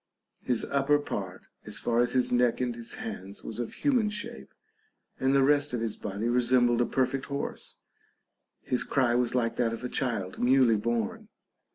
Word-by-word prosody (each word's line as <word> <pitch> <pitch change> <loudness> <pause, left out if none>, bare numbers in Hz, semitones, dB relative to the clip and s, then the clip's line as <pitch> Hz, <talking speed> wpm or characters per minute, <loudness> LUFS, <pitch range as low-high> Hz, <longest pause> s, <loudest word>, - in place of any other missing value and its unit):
His 125 -3 0
upper 140 +1 +2
part, 95 -10 -5 0.2
as - - -5
far 120 0 0
as 120 - +2
his 125 -1 +2
neck 125 -1 +3
and 125 -1 0
his 115 0 -7
hands, 95 +2 -7
was 115 - -6
of 120 - -3
human 250 -7 +2
shape, 210 - -6 0.7
and 135 +1 +2
the 135 - +5
rest 145 0 +3
of - - -2
his 115 -2 -2
body 105 +3 -4
resembled 120 0 +3
a 120 - +2
perfect 130 0 0
horse; 140 0 -4 0.9
his 125 - 0
cry 130 -4 +2
was 125 0 +1
like 115 -2 0
that 115 -2 +1
of 115 - -6
a 125 - -3
child 115 -10 -2
newly 125 -2 +5
born. 115 0 -2
120 Hz, 180 wpm, -28 LUFS, 115-135 Hz, 0.9 s, the